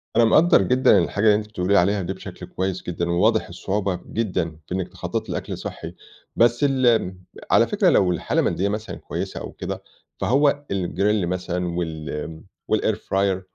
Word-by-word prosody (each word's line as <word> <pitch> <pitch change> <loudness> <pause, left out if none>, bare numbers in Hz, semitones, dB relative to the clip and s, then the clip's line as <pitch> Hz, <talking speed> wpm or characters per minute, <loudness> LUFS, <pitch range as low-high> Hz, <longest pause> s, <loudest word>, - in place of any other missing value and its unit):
أنا 120 - +5
مقدّر 155 - +5
جدًا 125 +2 +4
الحاجة 100 +5 0
اللي 105 -1 +6
أنتِ 105 0 -2
بتقولي 100 -2 -1
لي - - +6
عليها 100 +3 +2
دي 95 +1 -3
بشكل 95 - -9
كويس 95 0 -3
جدًا، 85 0 -3
وواضح 110 +6 +2
الصعوبة 95 +1 -2
جدًا 90 -8 -1
في 90 - -3
إنِّك 95 -1 -2
تخططي - - -5
لأكْل - - -4
صحّي - - -7 0.4
بس 120 +3 +3
ال 120 -9 +2 0.4
على - - +5
فكرة - - +3
لو 90 -2 +4
الحالة 85 - -1
المادية 100 +2 0
مثلًا 105 +1 -4
كويسة - - -5
أو - - -7
كده، - - -6 0.4
فهو 145 +2 +2
الgrill 100 +2 0
مثلًا 90 0 -2
وال 80 -1 -5 0.3
والair 110 0 +2
fryer 95 -2 0
100 Hz, 170 wpm, -23 LUFS, 90-110 Hz, 0.4 s, اللي